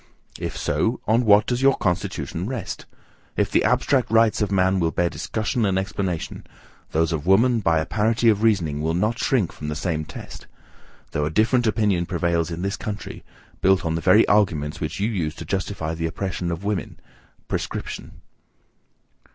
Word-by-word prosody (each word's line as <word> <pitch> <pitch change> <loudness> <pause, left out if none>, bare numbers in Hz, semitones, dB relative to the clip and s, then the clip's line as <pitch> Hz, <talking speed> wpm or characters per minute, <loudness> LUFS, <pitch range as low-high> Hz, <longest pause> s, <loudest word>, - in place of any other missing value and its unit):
If - - -4
so, - - 0
on 115 +3 +2
what 105 -1 +6
does 125 0 -1
your 135 0 +4
constitution 90 -2 -2
rest? 125 -6 -5 0.5
If - - +1
the - - +3
abstract 130 -3 +2
rights 115 -1 +3
of 105 -1 0
man 95 0 +2
will 85 -2 +2
bear 85 +1 0
discussion 110 +2 -2
and 95 -2 +1
explanation, 95 -3 -3 0.4
those 80 +1 +1
of 80 0 -3
woman, 115 +5 +4
by 85 -6 +2
a 80 - 0
parity 110 +4 +1
of 105 -2 +4
reasoning, 85 -10 +1
will 80 +2 0
not 110 +6 0
shrink 115 -10 +1
from 75 - -8
the 75 - -3
same 80 -1 -2
test: 75 - -10 0.6
though 75 - -1
a - - 0
different 115 +7 +2
opinion 105 -6 +1
prevails 85 -1 0
in 85 +1 -5
this 100 +2 -2
country, 105 -1 -6 0.4
built 95 -1 +3
on 80 - 0
the 80 - -2
very 100 +6 +5
arguments 80 -8 +1
which 75 - -4
you 100 - +1
use 85 -9 -2
to 85 - -8
justify 95 -2 -2
the 80 0 -2
oppression 90 +1 -3
of 85 +3 -5
woman, 100 -2 -3 0.5
prescription. - - -5
95 Hz, 175 wpm, -23 LUFS, 80-110 Hz, 0.6 s, what